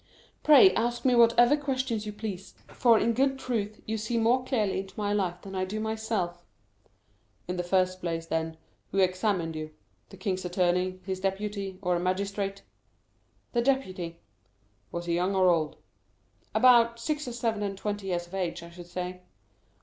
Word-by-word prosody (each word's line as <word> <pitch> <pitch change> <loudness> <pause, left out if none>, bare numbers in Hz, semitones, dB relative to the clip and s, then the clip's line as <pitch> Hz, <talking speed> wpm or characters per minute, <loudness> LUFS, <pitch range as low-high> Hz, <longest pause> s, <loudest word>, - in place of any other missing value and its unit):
"Pray 265 -11 +8
ask 240 +4 -1
me 255 - +5
whatever 240 +3 +6
questions 260 -6 -2
you - - -3
please; 205 -3 -6
for, 235 -3 +4
in 230 +2 +2
good 270 +3 +2
truth, 215 -5 -3
you 220 0 -2
see 220 +3 -2
more 235 +3 +3
clearly 220 -8 0
into 195 0 -8
my 205 -1 0
life 180 -4 -1
than 195 - -8
I 185 -1 -1
do 200 +3 -3
myself." 220 -5 -2 1.0
"In 180 - -2
the 180 - -1
first 185 +1 +1
place, 165 -1 -2
then, 160 0 -2 0.3
who - - -4
examined 185 -3 +1
you,—the 155 0 -11
king's 190 -3 -2
attorney, 180 +1 0
his 190 -1 -3
deputy, 195 0 -3
or 180 -1 +2
a - - 0
magistrate?" 195 +2 -2 0.9
"The 240 - +2
deputy." 185 -11 -1 0.7
"Was 170 0 -4
he 170 - -1
young 180 +3 +1
or 185 -1 +5
old?" 155 -3 0 0.8
"About 235 -2 +5
six 300 +3 -2
or 245 - -4
seven 230 -3 -1
and 200 -1 -3
twenty 205 -1 -3
years 175 -2 -1
of 175 - -19
age, 180 -3 -2
I 170 - -11
should 175 0 -11
say." 180 +1 -5
195 Hz, 170 wpm, -28 LUFS, 180-230 Hz, 1.0 s, Pray